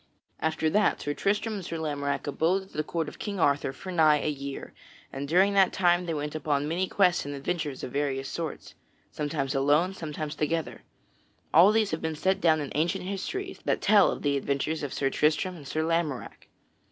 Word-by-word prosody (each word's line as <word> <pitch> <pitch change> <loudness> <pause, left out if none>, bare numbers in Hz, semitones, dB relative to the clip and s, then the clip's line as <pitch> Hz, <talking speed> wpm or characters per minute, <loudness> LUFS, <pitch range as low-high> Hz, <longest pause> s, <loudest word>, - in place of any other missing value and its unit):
After 160 0 0
that 210 +7 +2
Sir 145 - -2
Tristram 210 +7 0
and 200 -3 -5
Sir 165 -1 -4
Lamorack 145 -3 -2
abode 165 +7 +1
at 190 - -18
the 155 - -1
court 165 0 -2
of - - -9
King 200 -3 -4
Arthur 140 -3 +2
for 185 +8 -8
nigh 155 -4 +5
a 150 - -1
year, 140 -1 -6 0.4
and 140 +1 -4
during 190 +6 +4
that 195 -2 +5
time 175 -1 +2
they 165 - -1
went 150 0 -3
upon 145 -2 -1
many 175 +4 0
quests 185 -3 +3
and 145 0 -5
adventures 145 -1 -3
of - - -5
various 135 -1 -1
sorts 165 -3 -5 0.4
sometimes 145 -2 -2
alone, 145 +7 +2
sometimes 155 -3 -5
together. 160 +1 -2 0.7
All 180 +6 +8
these 215 -2 +2
have 160 - -2
been 160 -1 -2
set 190 +5 0
down 160 -2 +4
in 145 - -5
ancient 165 +4 0
histories 375 - -4
that - - +1
tell 205 -1 +5
of - - -4
the 140 -1 +2
adventures 140 +3 -1
of 145 -3 -4
Sir 135 -1 0
Tristram 155 +5 +1
and 145 -5 -11
Sir 155 +3 -1
Lamorack. 165 -5 -2
155 Hz, 200 wpm, -27 LUFS, 145-180 Hz, 0.7 s, All